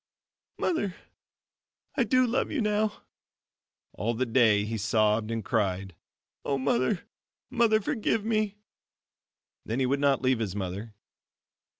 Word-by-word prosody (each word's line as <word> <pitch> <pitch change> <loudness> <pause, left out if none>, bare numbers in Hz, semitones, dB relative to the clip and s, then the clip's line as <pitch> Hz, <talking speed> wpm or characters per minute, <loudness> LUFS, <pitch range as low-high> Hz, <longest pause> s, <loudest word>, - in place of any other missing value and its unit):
"Mother, 205 - -1 1.0
I - - +1
do 255 -1 +4
love 245 +2 0
you 305 - -1
now," 210 -1 0 0.9
all 115 +5 -2
the 130 +3 0
day 110 -4 +4
he 115 +1 -3
sobbed 110 +1 +2
and 115 -3 -3
cried, 95 -4 -1 0.5
"O 140 - 0
Mother, 135 - +1 0.5
Mother, 230 -3 +4
forgive 220 -1 -1
me." 215 -2 0 1.1
Then 115 +4 -2
he 130 - +2
would 140 +2 +1
not 140 -2 +2
leave 130 -2 +2
his 100 -4 -3
mother. 100 +3 -5
130 Hz, 125 wpm, -28 LUFS, -, 1.1 s, do